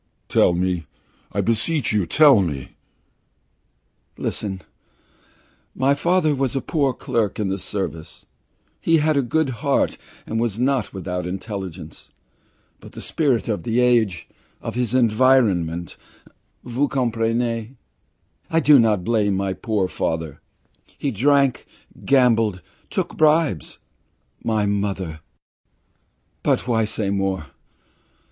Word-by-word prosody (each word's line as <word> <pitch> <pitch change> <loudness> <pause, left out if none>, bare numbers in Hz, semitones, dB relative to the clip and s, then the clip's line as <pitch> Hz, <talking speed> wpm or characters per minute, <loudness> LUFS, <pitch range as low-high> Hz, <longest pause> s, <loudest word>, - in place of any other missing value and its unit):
"Tell 90 - +4
me! 90 -3 -1 0.4
I - - 0
beseech 115 +4 0
you, 100 -5 +1
tell 140 - +6
me!" 75 -8 -3 1.5
"Listen. 95 -3 -4 1.1
My 135 +2 +3
father 165 +1 +2
was 135 -2 -1
a - - +1
poor 140 -4 0
clerk 115 -4 -2
in 105 -2 0
the 95 +1 -2
Service. 90 -5 -5 0.5
He 165 0 +3
had 155 0 +2
a 140 - +3
good 150 +3 0
heart 140 -1 +1 0.3
and 110 - -2
was 115 -3 -1
not 130 -2 +1
without 90 -2 -4
intelligence; 95 -4 -7 0.7
but - - -14
the - - -9
spirit 140 -8 0
of 110 -3 -1
the 120 0 0
age 115 -8 +2 0.3
of - - -5
his 125 0 -1
environment 110 -9 +2 0.7
vous 125 +4 0
comprenez? 115 -2 0 0.8
I 165 - +2
do 150 -3 +6
not 105 -5 +2
blame 105 -3 +1
my 95 -1 -1
poor 105 -2 -1
father. 80 -5 -3 0.6
He 140 - -2
drank, 140 +3 +2 0.4
gambled, 115 -8 +3 0.3
took - - -3
bribes. 155 - +2 0.7
My 110 -2 +1
mother 100 -5 -2 1.2
but - - 0
why 110 -2 +2
say 105 -2 -2
more? 95 -4 -1
115 Hz, 120 wpm, -22 LUFS, 95-130 Hz, 1.5 s, tell